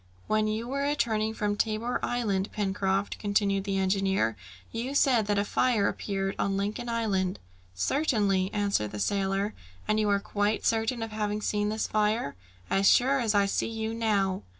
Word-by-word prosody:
"When 215 0 +1
you 220 +2 -2
were 275 +2 -2
returning 225 -7 0
from 205 -1 0
Tabor 225 +3 -1
Island, 205 -5 -1
Pencroft," 195 -1 -1
continued 200 -1 +1
the 195 -1 -1
engineer, 190 - +1 0.4
"you 250 +5 -3
said 245 -7 +3
that 205 -1 +1
a 200 - +1
fire 230 -2 +2
appeared 195 -1 -2
on 195 -1 0
Lincoln 210 +4 -3
Island?" 200 -6 0 0.4
"Certainly," 200 - +1
answered 200 - 0
the 105 - -4
sailor. 195 - 0 0.3
"And 215 0 +2
you 210 -1 +2
are 200 0 +3
quite 205 +1 -1
certain 225 +1 +1
of 225 - -5
having 210 -1 -2
seen 210 0 0
this 220 +1 -1
fire?" 210 -7 0 0.3
"As 195 0 +4
sure 270 +3 +4
as 225 -4 +1
I 200 -1 +4
see 200 - -1
you 225 0 -3
now." 205 -5 0
210 Hz, 170 wpm, -28 LUFS, 195-225 Hz, 0.4 s, As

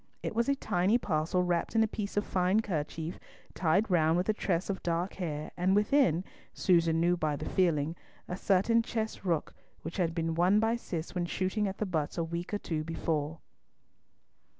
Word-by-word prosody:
It - - -2
was 235 +4 +1
a 280 - +3
tiny 195 -3 +2
parcel 175 -3 0
wrapped 175 +4 -1
in 225 - +5
a - - +2
piece 205 -1 -5
of 205 - +3
a - - -16
fine 185 +3 +2
kerchief, 160 -3 -4 0.3
tied 185 +5 +1
round 165 -1 +4
with 180 - 0
a - - +4
tress 185 -4 -1
of 195 -2 -3
dark 170 +2 -1
hair, 155 -4 -4
and 185 +2 +2
within, 210 - +3 0.3
Susan 165 -3 +3
knew 175 +1 +3
by 155 -3 -1
the - - -5
feeling, 165 -4 +1 0.3
a 180 - -3
certain 200 +5 +3
chess 220 -3 -3
rook 170 -5 -1 0.3
which 165 +4 -6
had 170 -3 0
been 165 -1 -1
won 180 +5 +4
by 225 +1 +2
Cis 170 -8 -5
when 175 -2 -1
shooting 190 +4 -1
at 195 - -4
the 215 - -1
butts 160 -5 -2
a 170 - +1
week 170 +2 -4
or 205 - 0
two 160 -6 -3
before. 160 -1 -2
180 Hz, 195 wpm, -30 LUFS, 165-200 Hz, 0.3 s, in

